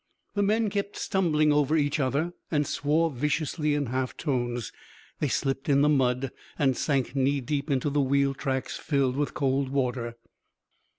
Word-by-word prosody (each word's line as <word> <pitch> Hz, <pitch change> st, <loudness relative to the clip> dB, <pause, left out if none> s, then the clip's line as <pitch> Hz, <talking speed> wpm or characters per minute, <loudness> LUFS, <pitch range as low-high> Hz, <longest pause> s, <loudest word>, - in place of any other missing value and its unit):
The 205 Hz, -, 0 dB
men 215 Hz, +1 st, +2 dB
kept 200 Hz, 0 st, -2 dB
stumbling 155 Hz, -6 st, +2 dB
over 150 Hz, +2 st, +3 dB
each 145 Hz, 0 st, +1 dB
other, 145 Hz, +6 st, 0 dB, 0.2 s
and 150 Hz, -2 st, +1 dB
swore 155 Hz, +4 st, +1 dB
viciously 150 Hz, +2 st, 0 dB
in 145 Hz, -1 st, 0 dB
half 130 Hz, +1 st, -2 dB
tones; 120 Hz, -6 st, -2 dB, 0.5 s
they 150 Hz, -, +1 dB
slipped 135 Hz, +1 st, -1 dB
in 140 Hz, -1 st, +4 dB
the 150 Hz, -, +4 dB
mud 130 Hz, -2 st, +1 dB, 0.3 s
and 135 Hz, -3 st, +2 dB
sank 135 Hz, -3 st, 0 dB
knee 140 Hz, +1 st, +2 dB
deep 145 Hz, +3 st, -2 dB
into 140 Hz, +1 st, +1 dB
the 145 Hz, 0 st, +2 dB
wheel 140 Hz, 0 st, +2 dB
tracks 135 Hz, -1 st, -3 dB
filled 140 Hz, -4 st, 0 dB
with 145 Hz, +1 st, -1 dB
cold 135 Hz, -1 st, +1 dB
water. 125 Hz, -3 st, -1 dB
140 Hz, 165 wpm, -27 LUFS, 130-150 Hz, 0.5 s, in